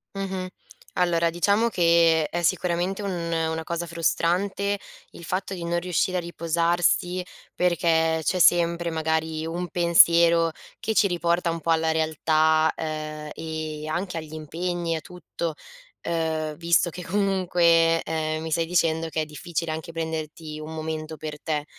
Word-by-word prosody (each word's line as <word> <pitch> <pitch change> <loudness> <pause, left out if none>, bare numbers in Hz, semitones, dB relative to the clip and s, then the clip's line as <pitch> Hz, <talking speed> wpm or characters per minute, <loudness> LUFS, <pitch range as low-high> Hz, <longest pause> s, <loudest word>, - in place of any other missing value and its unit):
Mh-mh. 190 -2 -3 0.5
Allora 170 -2 +2
diciamo 200 +7 +2
che, 165 -4 +4
è 175 - -2
sicuramente 180 +3 0
un 200 - -2 0.2
una 160 0 -1
cosa 170 0 -3
frustrante 185 +4 0 0.3
il 170 - -11
fatto 190 +3 -3
di 170 -2 -5
non 175 0 0
riuscire 180 +1 0
a - - 0
riposarsi, 170 +2 +1 0.3
perché 165 -2 +2
c'è 185 - 0
sempre, 170 0 +3
magari, 160 0 -1
un 175 +2 -3
pensiero, 170 -1 +5 0.3
che 220 - -2
ci 205 - +4
riporta 170 -1 0
un 165 - -4
po' 165 +2 -1
alla 160 0 +2
realtà, 160 0 +2
uhm, 155 -1 -5
e 155 -1 -5
anche 175 +3 -3
agli 155 -1 -7
impegni, 165 +2 -3
a 160 - -4
tutto, 170 -1 -6 0.5
uhm, 160 -2 -1
visto 170 +2 +2
che 180 +2 -8
comunque, 170 -3 +3
ehm, 155 -1 -2
mi 160 0 -5
stai 165 +1 +1
dicendo 165 -1 +1
che 160 - -3
è - - -2
difficile 160 +2 -4
anche 160 +1 -6
prenderti 160 -1 -5
un 155 +1 -7
momento 155 0 -5
per 150 0 -7
te. 150 -2 -2
165 Hz, 150 wpm, -25 LUFS, 160-175 Hz, 0.5 s, pensiero